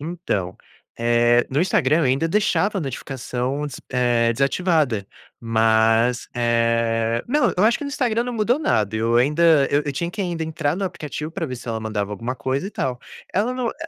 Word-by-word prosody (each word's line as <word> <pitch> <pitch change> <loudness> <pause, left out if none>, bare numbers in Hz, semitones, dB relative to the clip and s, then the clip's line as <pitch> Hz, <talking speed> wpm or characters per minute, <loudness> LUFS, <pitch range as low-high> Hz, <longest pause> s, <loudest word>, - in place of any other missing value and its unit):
Então, 150 - -3 0.4
eh, 120 +1 +3
no 140 +4 +1
Instagram 155 -4 +2
eu 165 - +2
ainda 135 +5 +1
deixava 205 +1 +1
a - - -2
notificação 135 0 -4
des 140 - -8
eh, 120 -2 +2
desativada, 140 - +1 0.3
mas, 115 +1 +2
eh 115 -1 +1
não, 295 +3 +2
eu 185 - +3
acho 230 +2 +3
que 290 - -6
no - - -3
Instagram 240 -4 0
não 245 - -4
mudou 235 +3 +1
nada, 110 - 0
eu 115 +2 +1
ainda 150 +2 +4
eu 145 0 0
tinha 170 +5 -3
que 205 - -6
ainda 170 -3 -2
entrar 160 -1 -2
no 195 - -2
aplicativo 150 -3 -5
para 170 -2 -3
ver 130 -3 -5
se 120 - -10
ela 110 -1 -2
mandava 105 -2 -3
alguma 115 +5 -4
coisa 130 +8 -2
e - - -6
tal. 125 -8 -3 0.3
Ela 220 +6 +1
não 250 -2 -2
e - - -9
135 Hz, 190 wpm, -22 LUFS, 115-170 Hz, 0.4 s, ainda